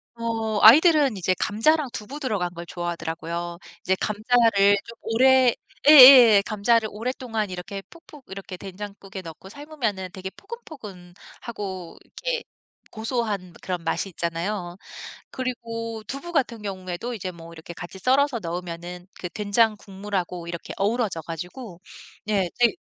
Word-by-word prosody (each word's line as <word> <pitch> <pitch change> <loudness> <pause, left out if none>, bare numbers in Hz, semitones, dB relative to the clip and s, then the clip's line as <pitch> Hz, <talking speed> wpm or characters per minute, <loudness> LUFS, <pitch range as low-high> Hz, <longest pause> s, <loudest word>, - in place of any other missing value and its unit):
어 225 -2 -2
아이들은 290 - +7
이제 185 0 +1
감자랑 295 +8 +2
두부 255 +8 -7
들어간 205 - -2
걸 170 0 -8
좋아하더라고요. 170 0 -5 0.3
이제 190 - +2
감자를 215 -2 +3
좀 230 - -12
오래 255 +1 +4 0.3
예예 255 -8 +10
감자를 220 +1 +1
오랫동안 225 -1 -3
이렇게 185 +2 -6
푹푹 305 -5 -16
이렇게 190 -1 -8
된장국에 195 0 -8
넣고 165 +1 -11
삶으면은 235 -8 -4
되게 190 -1 -6
포근포근하고 205 - -9
이렇게 - - -4 0.5
고소한 220 -5 -3
그런 180 -2 -4
맛이 180 +4 -1
있잖아요. 175 +2 -3 0.5
그리고 230 -3 -5
두부 280 +8 -6
같은 250 -8 -1
경우에도 190 +3 -5
이제 190 -5 -5
뭐 165 -1 -12
이렇게 165 +1 -10
같이 175 +3 -9
썰어서 265 +3 +2
넣으면은 175 0 -6
그 180 - -4
된장 215 +3 +1
국물하고 190 -3 -5
이렇게 170 -1 -6
어우러져 205 -4 0
가지고 180 - -8 0.5
예. 195 -4 +1
제일 240 -1 +4
205 Hz, 330 characters per minute, -24 LUFS, 180-240 Hz, 0.5 s, 예예